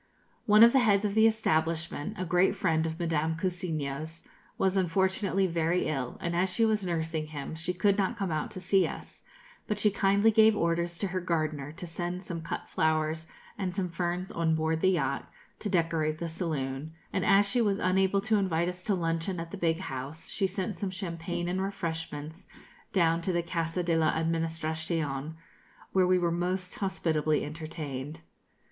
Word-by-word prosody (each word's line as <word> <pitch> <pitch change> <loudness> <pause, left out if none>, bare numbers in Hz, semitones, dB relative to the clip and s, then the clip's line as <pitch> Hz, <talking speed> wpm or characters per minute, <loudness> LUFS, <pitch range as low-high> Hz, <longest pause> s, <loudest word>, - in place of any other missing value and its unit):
One 210 +1 +8
of 235 - +8
the 270 - +6
heads 210 -4 +3
of 200 - 0
the 220 +1 +6
establishment, 165 -3 0
a 185 - -2
great 180 +2 +3
friend 165 -3 +1
of 160 +1 -5
Madame 160 -1 0
Cousiño's, 160 -3 -3 0.3
was 190 0 +2
unfortunately 190 +2 +1
very 170 0 +1
ill, 135 -5 -2
and 170 0 -2
as 180 +2 +1
she 225 +4 +3
was 215 -2 +1
nursing 160 -3 -2
him, 150 -1 -6
she 160 +3 -2
could 195 +3 +2
not 200 +4 0
come 195 -5 -2
out 155 -1 -1
to - - -7
see 190 0 +3
us; - - -9 0.5
but 210 - -1
she 210 0 +3
kindly 200 +2 +3
gave 220 0 +5
orders 170 0 0
to 200 - -2
her 185 0 -2
gardener 155 -5 -1
to 180 +2 -7
send 175 +2 -4
some 170 -3 -5
cut 165 - -5
flowers 160 0 0 0.3
and 185 -3 -2
some 190 -3 -1
ferns 175 +2 -2
on 165 -1 +1
board 160 0 0
the 185 - +4
yacht, 180 -2 0 0.3
to 210 - -3
decorate 165 -4 +1
the 170 - -3
saloon; 155 -3 -3 0.2
and - - 0
as 200 +1 +5
she 245 +4 +1
was 205 -3 +2
unable 190 +1 +2
to 215 +1 +2
invite 170 -4 +1
us 180 0 -8
to 200 - +1
luncheon 165 +1 -1
at 165 0 -6
the - - -5
big 170 -2 0
house, 135 +1 -6
she 195 - +1
sent 190 +1 -4
some 200 - -1
champagne 175 -1 -4
and 185 +2 -1
refreshments 165 -3 -4 0.4
down 170 -3 +3
to 185 - -1
the 175 -1 0
Casa 170 +1 -2
de 170 -1 +1
la 160 -1 +3
Administracion, 160 -2 -2 0.6
where 185 -1 +3
we 185 0 +4
were 175 -1 +1
most 180 +2 -1
hospitably 160 -6 0
entertained. 150 -1 -6
170 Hz, 185 wpm, -29 LUFS, 160-190 Hz, 0.6 s, One